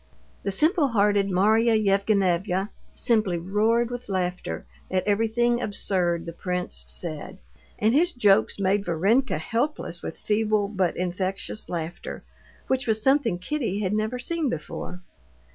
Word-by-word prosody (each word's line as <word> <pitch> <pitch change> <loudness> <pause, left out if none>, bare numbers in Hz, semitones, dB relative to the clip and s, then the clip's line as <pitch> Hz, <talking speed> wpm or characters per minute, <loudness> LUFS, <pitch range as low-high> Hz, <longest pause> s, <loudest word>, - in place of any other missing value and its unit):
The 200 - -2
simple 305 - +3
hearted 205 -4 +2
Marya 220 +5 +4
Yevgenyevna 195 -2 +1 0.2
simply 215 -7 +1
roared 220 +7 +1
with 245 -2 -6
laughter 180 -2 -2 0.2
at 185 0 0
everything 225 +3 +2
absurd 180 -5 0
the 170 - -6
prince 180 +1 -3
said, 170 +2 -6 0.4
and 220 +2 +2
his 340 +6 +3
jokes 210 -5 +3
made 195 +1 +2
Varenka 200 +10 +2
helpless 235 - -2
with - - -6
feeble 215 -1 +1
but 190 -5 0
infectious 185 +3 -3
laughter, 170 0 -5 0.4
which 260 -1 0
was 220 -1 +2
something 265 -5 +2
Kitty 210 -1 -2
had 195 -1 0
never 215 +3 -1
seen 320 +3 -1
before. 180 +2 -5
205 Hz, 130 wpm, -25 LUFS, 185-230 Hz, 0.4 s, Marya